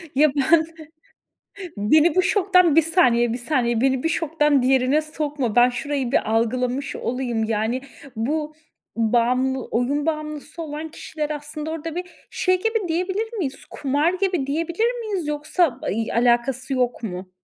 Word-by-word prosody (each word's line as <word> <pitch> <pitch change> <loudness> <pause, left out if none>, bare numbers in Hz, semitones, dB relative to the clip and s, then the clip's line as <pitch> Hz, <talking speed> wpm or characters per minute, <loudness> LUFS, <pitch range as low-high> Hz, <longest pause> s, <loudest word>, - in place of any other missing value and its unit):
Ya 300 +3 +5
ben 315 +4 +4 1.1
Beni 305 +12 +4
bu 370 - +4
şoktan 365 -5 +3
1 325 - +7
saniye 250 -9 +3
1 240 - -3
saniye 240 -3 0
beni 265 0 +1
bir - - +1
şoktan 300 -4 +1
diğerine 260 +3 +3
sokma, 295 -6 -3
ben 245 +1 +7
şurayı 265 0 -3
bir - - +1
algılamış 250 +4 0
olayım, 240 -2 -2
yani, 220 +3 -1 0.4
bu 300 +7 -2 0.4
bağımlı 250 +3 +1
oyun 280 +6 0
bağımlısı 305 +1 -4
olan 310 0 -6
kişiler 305 -1 -5
aslında 300 +1 -5
orada 325 0 -5
bir 360 - -2 0.3
şey 370 0 +1
gibi 450 -4 0
diyebilir 380 +7 -2
miyiz 270 -7 -4
kumar 290 +5 0
gibi 370 -7 -1
diyebilir 340 - -1
miyiz 400 -8 -3
yoksa 300 -1 0
ay 225 -6 -2
alakası 245 +3 +1
yok 250 -2 0
mu? 185 -3 -6
290 Hz, 145 wpm, -22 LUFS, 245-325 Hz, 1.1 s, 1